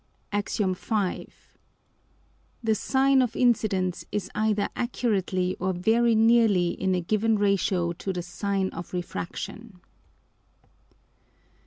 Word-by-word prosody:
_ - - 0
AX. 205 -1 -2
V. 210 - +2
_The 190 +1 -1 1.5
Sine 270 +4 +3
of 240 -3 -1
Incidence 200 -7 +1
is 210 -1 -3
either 210 -1 +1
accurately 195 -7 -1
or 185 +1 0
very 225 +6 +2
nearly 220 -5 +4
in 190 +1 -1
a 180 - 0
given 215 +5 +1
Ratio 195 -4 +1
to 190 +3 -4
the 180 -2 -4
Sine 190 +2 -2
of 170 +2 -8
Refraction. 185 +3 -6
200 Hz, 115 wpm, -26 LUFS, 185-225 Hz, 1.5 s, nearly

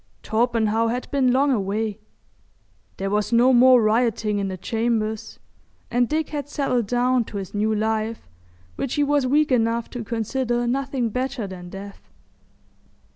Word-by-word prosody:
Torpenhow 225 -1 +1
had 245 +2 -3
been 265 -3 +2
long 275 +3 +3
away; 210 -1 -1 1.0
there 195 0 -3
was 210 +2 0
no 245 +2 +5
more 250 -1 +6
rioting 215 -1 +1
in 200 - -1
the 190 -1 -5
chambers, 220 +1 -2 0.5
and 245 0 +2
Dick 310 0 -1
had 290 -1 -5
settled 255 -6 0
down 245 +2 +2
to 205 - -7
his 195 -2 -6
new 215 +1 0
life, 220 - -2 0.5
which 270 - -2
he 295 - +2
was 285 -2 +2
weak 295 +2 +2
enough 230 -1 +1
to 245 -2 -5
consider 240 +2 -1
nothing 265 -1 -1
better 255 0 -3
than 180 -2 -8
death. 195 +2 -10
235 Hz, 150 wpm, -23 LUFS, 215-255 Hz, 1.0 s, more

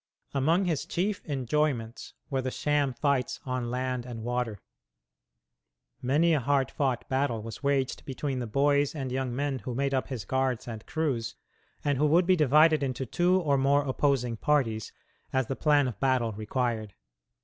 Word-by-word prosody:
Among 160 +8 +2
his 165 -5 -1
chief 195 +3 -1
enjoyments 135 -4 -1 0.2
were 135 -1 +1
the 130 - -2
sham 145 0 0
fights 130 0 0
on 125 -2 -2
land 125 0 -2
and 120 -2 -7
water. 120 -3 -2 1.4
Many 155 +7 +3
a 155 - +3
hard 135 +1 +1
fought 130 -4 -1
battle 130 -5 0
was 115 0 -8
waged 140 -2 0
between 135 0 -3
the 120 - -3
boys 140 +5 +2
and 135 -4 -4
young 130 -1 -2
men 140 -1 -1
who 120 +3 -5
made 140 +1 0
up 130 - 0
his 125 -9 -5
guards 130 +1 -1
and 110 -2 -6
crews, 135 -8 -2 0.5
and 145 -2 +1
who 150 - +4
would 170 +4 +4
be 185 +1 +4
divided 155 0 +5
into 130 -1 -2
two 180 +8 +2
or 140 -4 +2
more 140 +2 +3
opposing 130 -3 0
parties, 115 -6 0 0.4
as 130 -1 +1
the 135 - -3
plan 145 -2 +3
of 120 - -6
battle 130 -4 +2
required. 110 -1 -2
135 Hz, 170 wpm, -28 LUFS, 125-145 Hz, 1.4 s, divided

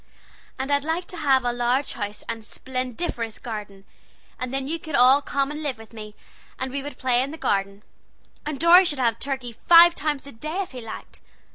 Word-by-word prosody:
And 270 +1 -3
I'd 285 0 +2
like 325 +3 -2
to 360 - -7
have 265 -5 +3
a 240 - +1
large 245 +3 0
house 205 -1 -5
and 230 0 -4
a - - -16
splendiferous 255 -1 -4
garden, 205 -4 -7 0.5
and 255 -1 -4
then 270 0 -2
you 330 +3 -3
could 315 -4 -5
all 260 +3 +6
come 280 0 -1
and 300 +1 -6
live 280 -5 -3
with 225 +1 -14
me, 215 -1 -9 0.4
and 260 0 -3
we 280 +1 -3
would 290 +1 -8
play 250 -1 +2
in 270 - -2
the 315 - -8
garden, 200 -5 -1 0.6
and 295 -2 -4
Dorry 345 +3 +8
should 300 -6 -1
have 230 -3 +1
turkey 265 -4 -3
five 340 0 +9
times 295 -4 -2
a 280 - -9
day 310 +11 -4
if - - -13
he 255 -2 -8
liked. 225 - -9
265 Hz, 215 wpm, -24 LUFS, 230-295 Hz, 0.6 s, five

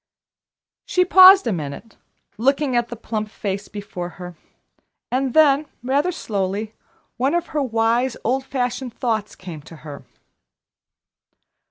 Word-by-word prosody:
She 365 0 +2
paused 375 0 +8
a 230 - 0
minute, 155 +7 -7 0.4
looking 275 +2 +1
at 240 0 +1
the 240 - -7
plump 215 -2 -4
face 200 -1 -4
before 200 -4 -7
her, 180 -1 -8 0.8
and 260 0 -1
then, 300 -1 +5 0.2
rather 280 +7 +1
slowly, 210 - -3 0.4
one 270 +6 +1
of 345 0 0
her 300 - +1
wise, 235 0 0
old 260 +4 0
fashioned 250 -2 -3
thoughts 220 -4 -2
came 170 -5 -9
to 165 +3 -13
her. 145 -2 -9
235 Hz, 130 wpm, -21 LUFS, 205-275 Hz, 0.8 s, paused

